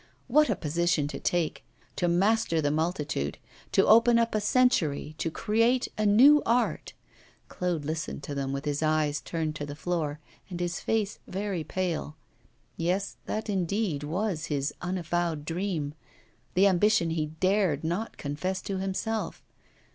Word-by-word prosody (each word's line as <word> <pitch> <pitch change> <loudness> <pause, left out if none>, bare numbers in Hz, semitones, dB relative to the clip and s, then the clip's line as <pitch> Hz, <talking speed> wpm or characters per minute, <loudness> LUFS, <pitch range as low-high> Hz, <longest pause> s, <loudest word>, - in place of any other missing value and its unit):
What 300 +4 +4
a - - +2
position 170 -1 0
to 140 - -5
take! 175 -3 -1 0.3
to 175 - 0
master 195 0 +2
the 145 -2 +1
multitude, 150 - -1 0.3
to - - +4
open 230 +2 +6
up 230 0 +1
a 215 - +1
century, 205 - +2
to 165 - 0
create 230 +7 +1
a 215 -1 +1
new 275 +9 +7
art! 240 +2 0 0.6
Claude 175 -5 -2
listened 155 -1 -4
to 145 - -5
them, 135 -1 -2
with 140 +1 -4
his 145 0 -1
eyes 155 -2 +1
turned 160 -2 -3
to 145 - -4
the 145 - -6
floor 155 -3 -2 0.3
and 175 -2 -5
his 175 -1 -2
face 215 -2 -1
very 195 -3 -3
pale. 165 -2 -3 0.6
Yes, 185 +4 -1
that 220 - -3
indeed 195 -4 -1
was 165 +2 -2
his 145 -2 -1
unavowed 175 -3 -2
dream, 165 -4 -2 0.6
the 190 +2 +5
ambition 190 -2 +3
he 155 -2 -1
dared 185 -6 +2
not 175 +8 -3
confess 170 +7 -3
to 195 -1 -3
himself. 195 +4 -3
175 Hz, 150 wpm, -28 LUFS, 155-205 Hz, 0.6 s, new